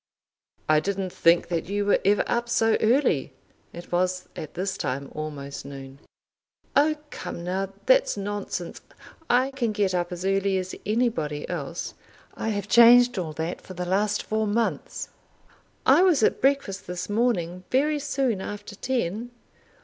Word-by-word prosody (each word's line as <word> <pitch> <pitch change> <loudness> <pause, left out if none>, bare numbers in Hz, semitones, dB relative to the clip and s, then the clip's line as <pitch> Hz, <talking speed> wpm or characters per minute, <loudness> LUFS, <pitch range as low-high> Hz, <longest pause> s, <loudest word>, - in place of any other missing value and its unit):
"I 155 0 +5
didn't 190 +2 -2
think 170 +1 +3
that 170 0 -2
you 205 0 0
were 205 - +3
ever 200 +1 +3
up 235 0 -1
so 225 -1 +3
early." 220 - +2 0.4
It 170 +1 -10
was 185 +1 0
at 155 -4 -7
this 185 +1 -2
time 135 +2 -3
almost 145 -2 -6
noon. 135 -1 -10 0.8
"Oh, 305 +2 +4 0.2
come 170 - -6
now, 190 +2 -2
that's - - +4
nonsense. 200 -3 -4 0.5
I 255 +2 +3
can 245 -5 -1
get 200 -3 +1
up 175 -1 -1
as 180 +1 -5
early 195 0 +1
as 185 0 -4
anybody 210 -11 0
else. 170 -1 -4 0.4
I 225 - -3
have 205 -2 -2
changed 240 +1 +7
all 160 -4 -4
that 160 +3 -4
for 185 - -11
the 180 +1 -3
last 205 +3 +1
four 220 0 -1
months. 225 +3 -2 0.8
I - - +6
was 350 -10 +4
at - - +2
breakfast 270 -8 +1
this 180 0 -4
morning 195 -6 0
very 295 +3 +2
soon 265 -8 -1
after 205 +1 -7
ten." 235 -1 -2
195 Hz, 155 wpm, -25 LUFS, 175-235 Hz, 0.8 s, changed